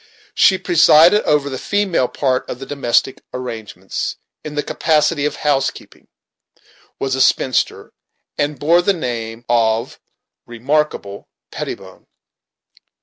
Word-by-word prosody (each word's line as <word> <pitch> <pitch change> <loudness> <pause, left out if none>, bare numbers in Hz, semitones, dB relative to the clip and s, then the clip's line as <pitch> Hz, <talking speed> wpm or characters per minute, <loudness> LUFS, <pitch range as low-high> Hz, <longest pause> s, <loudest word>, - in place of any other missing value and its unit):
She 190 - +4
presided 175 +1 +5
over 150 -1 +2
the 130 -2 -5
female 200 -10 0
part 130 +1 -1
of - - -5
the 135 - -8
domestic 135 -2 0
arrangements, 110 -7 -5 0.3
in 150 -1 -7
the 150 - -1
capacity 150 -1 +1
of 150 - -1
housekeeper; 140 -2 -2 0.9
was 135 -1 -2
a 130 - 0
spinster, 130 0 +1 0.4
and 145 0 -2
bore 170 +4 +3
the 200 +3 +2
name 120 -7 -5
of 115 -1 0 0.5
Remarkable 120 -4 -2 0.2
Pettibone. - - -8
140 Hz, 115 wpm, -18 LUFS, 120-155 Hz, 0.9 s, presided